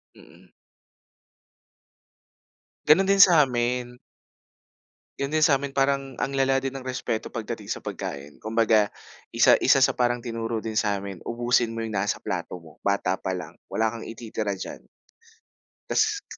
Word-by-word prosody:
Mm. - - -18 2.4
Gano'n 190 +6 +5
din 200 - +4
sa 180 -5 +8
amin. 125 -1 -1 1.2
Yun 140 +1 -2
din 155 - +2
sa 150 -2 +6
amin 140 +1 -4
parang 135 -1 0
ang 140 - -2
lala 135 0 +2
din 135 0 -4
ng 135 - -6
respeto 125 -3 -3
pagdating 110 -2 -5
sa - - -2
pagkain. 85 -8 -6
Kumbaga, 110 -1 +2 0.4
isa - - +6
isa - - +5
sa - - +3
parang 120 0 +1
tinuro 115 -1 -3
din 110 0 -5
sa'min, 100 -4 -2
ubusin 120 0 +1
mo 115 - -5
yung 110 -1 -4
nasa 100 +1 0
plato 90 - -4
mo, 80 -1 -18
bata 100 -2 +1
pa 95 - -4
lang. 90 -2 -6 0.2
Wala 110 +1 0
kang 115 - -7
ititira 110 -2 -4
diyan. - - -7 1.0
Tas 435 -2 0
115 Hz, 145 wpm, -25 LUFS, 105-135 Hz, 2.4 s, sa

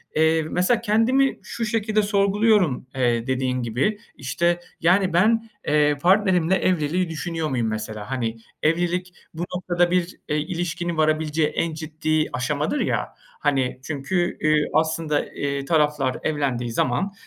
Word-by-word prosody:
eee, 160 +1 +3
mesela 180 +9 +1
kendimi 235 +5 +2
şu 230 - -4
şekilde 215 -1 +1
sorguluyorum, 200 - +2
eee, 120 -2 +1
dediğin 130 -1 0
gibi. 130 - 0 0.2
İşte, 170 +6 0 0.2
yani 185 +1 +3
ben, 225 +6 +3 0.2
eee, 150 -1 +3
partnerimle 185 -1 +3
evliliği 180 -1 0
düşünüyor 165 -1 -3
muyum 120 -4 0
mesela, 110 +1 -5
hani. 115 -3 -2 0.3
Evlilik 175 +3 0 0.2
bu 165 - -6
noktada 175 -1 +1
bir, 180 -1 0
eee, 150 - +1
ilişkinin 170 +1 -3
varabileceği 155 0 +1
en 165 +1 -2
ciddi 155 0 -1
aşamadır 150 - -1
ya. - - -1 0.3
Hani 130 -3 0
çünkü, 160 +5 -1
ııı, 155 -1 +3
aslında, 160 -1 +1
ııı, 140 -1 -3
taraflar 150 -4 +1
evlendiği 135 -6 -1
zaman, 130 - 0
160 Hz, 130 wpm, -23 LUFS, 145-185 Hz, 0.3 s, eee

